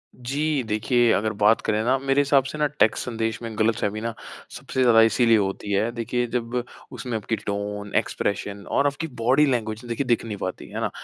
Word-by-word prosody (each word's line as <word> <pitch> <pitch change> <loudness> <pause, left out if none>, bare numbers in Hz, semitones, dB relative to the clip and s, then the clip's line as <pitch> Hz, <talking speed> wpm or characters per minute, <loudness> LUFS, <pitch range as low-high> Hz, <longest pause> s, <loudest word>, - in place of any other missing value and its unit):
जी 140 +3 -1
देखिए, 115 +2 +2
अगर 110 +1 0
बात 105 +2 +5
करें 110 0 0
ना, 130 +3 +2
मेरे 135 +1 +2
हिसाब 140 -1 +3
से 135 +3 -6
ना 150 0 +2
टेक्स्ट 140 -6 +1
संदेश 115 -2 -3
में 115 -2 -6
गलतफ़हमी 110 -1 0
ना 115 0 -3 0.4
सबसे 130 - -4
ज़्यादा 120 -3 +6
इसीलिए 115 +1 +4
होती 100 0 -2
है, 105 +4 +1
देखिए 120 +1 -2
जब 120 +1 -2 0.3
उसमें 125 -2 -5
आपकी 110 +1 -2
टोन, 105 0 -5
एक्सप्रेशन 100 0 -1
और 140 - +2
आपकी 145 +3 -3
बॉडी 130 +6 +4
लैंग्वेज 115 -4 -1
देखिए 120 +3 -2
दिख 120 -1 +1
नहीं 105 -3 -5
पाती, 95 -1 -5
है - - -5
ना? - - 0
115 Hz, 195 wpm, -24 LUFS, 110-130 Hz, 0.4 s, ज़्यादा